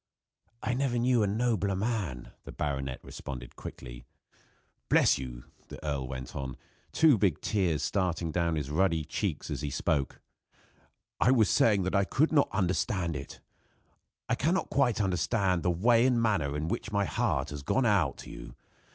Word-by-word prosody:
"I 125 - 0
never 125 -1 0
knew 120 0 +3
a 105 - +2
nobler 105 -2 0
man," 95 - -3
the - - -9
baronet 70 -3 -3
responded 60 -3 -8
quickly. - - -9 0.9
"Bless - - +4
you!" 60 -2 -7 0.2
the - - -9
earl 70 -3 -2
went 65 0 -7
on, 65 -1 -5 0.3
two 150 -9 +5
big 95 -6 +2
tears 90 -8 0
starting 90 -4 -1
down 85 -1 0
his 75 -2 -3
ruddy 80 -1 +1
cheeks 85 +1 -3
as - - -3
he 75 - -2
spoke. 70 0 -1 1.0
"I - - +4
was 110 -9 +4
saying 100 +2 +4
that 95 - -2
I 100 -1 +3
could 150 +10 +1
not 145 -3 +3
understand 95 -2 0
it. 70 0 -8 0.9
I - - 0
cannot 170 +7 0
quite 125 -6 +2
understand 95 -1 +1
the 90 - +1
way 115 +8 +4
and 125 -2 +2
manner 80 -11 +1
in 75 +1 -2
which 105 - -3
my 100 -1 +1
heart - - -1
has 75 -1 -6
gone 130 - +1
out 100 -5 +2
to - - -10
you. - - -10
95 Hz, 170 wpm, -29 LUFS, 75-110 Hz, 1.0 s, two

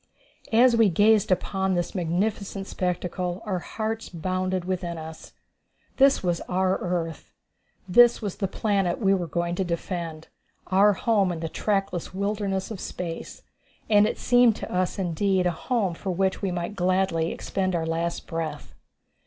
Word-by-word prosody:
As 240 +2 +5
we 225 -3 +5
gazed 205 +3 +4
upon 190 +1 0
this 175 -1 -2
magnificent 195 +3 -2
spectacle, 180 +1 -3
our 190 -4 -1
hearts 220 +4 -4
bounded 185 +1 -2
within 180 -2 -3
us. 160 0 -9 0.6
This 275 -4 +5
was 175 -2 0
our 185 +1 +1
earth 170 -3 -4 0.5
this 240 +6 +6
was 205 -5 -4
the 195 - -1
planet 195 -3 0
we 195 -3 +3
were 180 -3 -1
going 170 +2 -1
to 190 - 0
defend 170 -2 -4 0.4
our 200 +2 +4
home 200 -2 +2
in 170 - -4
the 165 0 -3
trackless 195 -3 -2
wilderness 200 -1 -2
of 210 - -6
space. 170 -3 -6 0.5
And 210 0 +6
it - - -3
seemed 245 -2 +4
to - - -7
us 180 +2 0
indeed 190 +1 +1
a 180 - +3
home 195 +1 -1
for 190 +3 -6
which 190 +1 0
we 195 - 0
might 175 +2 -3
gladly 185 -3 +1
expend 185 -2 -2
our 165 -1 -1
last 165 +1 -2
breath. 165 -2 -5
185 Hz, 155 wpm, -25 LUFS, 175-200 Hz, 0.6 s, this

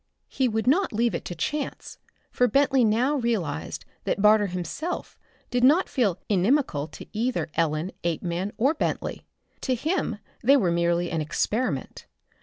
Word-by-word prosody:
He 265 - +1
would 220 -1 -1
not 315 +11 +3
leave 230 0 +1
it 170 - -3
to 175 - -5
chance, 290 - -4 0.3
for 250 - +3
Bentley 270 -1 +3
now 240 +7 +2
realized 195 - -2 0.2
that - - -1
Barter 210 0 +5
himself 180 - -4 0.4
did 245 0 +1
not 305 +9 +5
feel 210 -9 +1
inimical 195 - +1
to - - -11
either 230 -5 -1
Ellen, 160 +2 0
Apeman 170 +3 -2
or 270 +7 +3
Bentley. 315 - -3 0.3
To 260 - 0
him 300 - -1 0.3
they 275 +4 +6
were 185 -9 +2
merely 170 0 +1
an 160 -1 -1
experiment. 220 +10 -2
220 Hz, 150 wpm, -26 LUFS, 175-260 Hz, 0.4 s, they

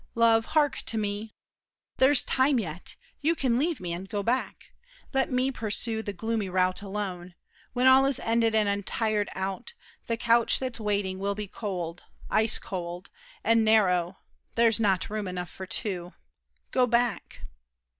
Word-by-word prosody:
Love, 230 -1 +4
hark 295 -2 +3
to 225 - -1
me! 210 +1 -3 0.6
There's 265 0 +5
time 265 +1 +2
yet; 175 -4 -4 0.3
you 320 +3 +2
can 250 -5 +1
leave 330 +3 0
me 175 -2 -4
and 185 +3 -7
go 205 -2 -2
back. 245 +5 -2 0.4
Let 270 0 +1
me 255 +1 +1
pursue 220 -1 -1
the 205 - -4
gloomy 220 +1 -2
route 185 0 +1
alone. 190 -3 -5 0.4
When 250 +1 +1
all 260 +1 +7
is 275 -2 +2
ended 225 -1 +1
and 215 -1 +3
I'm 200 0 0
tired 215 0 0
out, 190 - -4 0.3
The 230 - -1
couch 235 0 +3
that's 255 -3 -4
waiting 200 -3 -1
will 200 +1 -1
be 210 0 -5
cold—ice 190 +3 -2
cold, 175 0 -6 0.3
And 230 0 +4
narrow; 190 -5 +3 0.4
there's 230 -1 +3
not 200 -3 +1
room 210 -2 -3
enough 180 -1 -5
for 190 - -8
two. 180 -3 -2 0.6
Go 255 -1 +3
back! 235 -2 0
215 Hz, 155 wpm, -27 LUFS, 190-235 Hz, 0.6 s, all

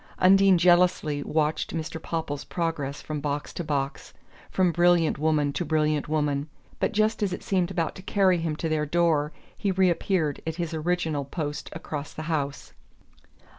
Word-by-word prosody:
Undine 195 0 +6
jealously 175 -4 +3
watched 155 +2 -1
Mr. 160 0 -4
Popple's 150 -4 -3
progress 155 -5 -3
from 155 -1 -4
box 145 0 -3
to 175 - -4
box, 140 -3 -3 0.3
from 185 -2 +2
brilliant 175 -3 +3
woman 150 -2 +1
to 175 - -1
brilliant 155 -2 0
woman; 150 -1 0 0.3
but - - +1
just 215 +1 +1
as 200 -3 0
it - - -6
seemed 185 -3 +1
about 170 -4 -1
to - - -10
carry 190 -2 +2
him 165 -2 -2
to 165 - -3
their 155 -1 0
door 160 -2 +2 0.2
he 200 - -2
reappeared 185 -4 +1
at 160 - -2
his 170 -1 -3
original 160 -2 -1
post 150 0 -4
across 150 -2 -6
the 155 - -5
house. 145 -3 -3
160 Hz, 165 wpm, -26 LUFS, 150-175 Hz, 0.3 s, Undine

